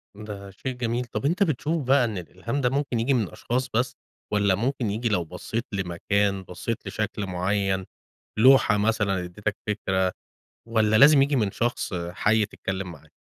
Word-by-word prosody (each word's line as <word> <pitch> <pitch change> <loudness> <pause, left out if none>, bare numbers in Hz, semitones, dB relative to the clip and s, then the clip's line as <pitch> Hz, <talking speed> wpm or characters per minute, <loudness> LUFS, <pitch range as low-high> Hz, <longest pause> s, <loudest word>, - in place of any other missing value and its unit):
ده 100 -2 -8
شيء 130 +7 -5
جميل. 120 0 -2
طب 120 - -4
أنت 175 +7 +3
بتشوف 155 -1 -1
بقى 135 -2 +5
إن 110 -4 -3
الإلهام 95 +10 -4
ده 125 - +3
ممكن 135 -3 -1
ييجي 130 +5 +2
من 110 -8 +1
أشخاص 125 +2 -2
بس 120 +2 +1 0.4
والّا 100 -2 +3
ممكن 120 +2 -1
ييجي 115 +3 -1
لو 90 -5 +1
بصّيت 110 +8 -4
لمكان، 100 +1 0
بصّيت 100 +5 -5
لشكل 105 -1 -3
معيّن، 95 +1 0 0.5
لوحة 125 -3 +6
مثلًا 100 -3 +1
ادّيتك 105 +4 -3
فكرة 95 -3 0 0.6
والّا 110 -1 +3
لازم 140 +3 +8
ييجي 140 0 +2
من 105 -5 +1
شخص 120 -4 -1 0.2
حَي 105 +1 +2
تتكلّم 95 -3 -5
معاه؟ 75 - -16
105 Hz, 165 wpm, -25 LUFS, 95-125 Hz, 0.6 s, لازم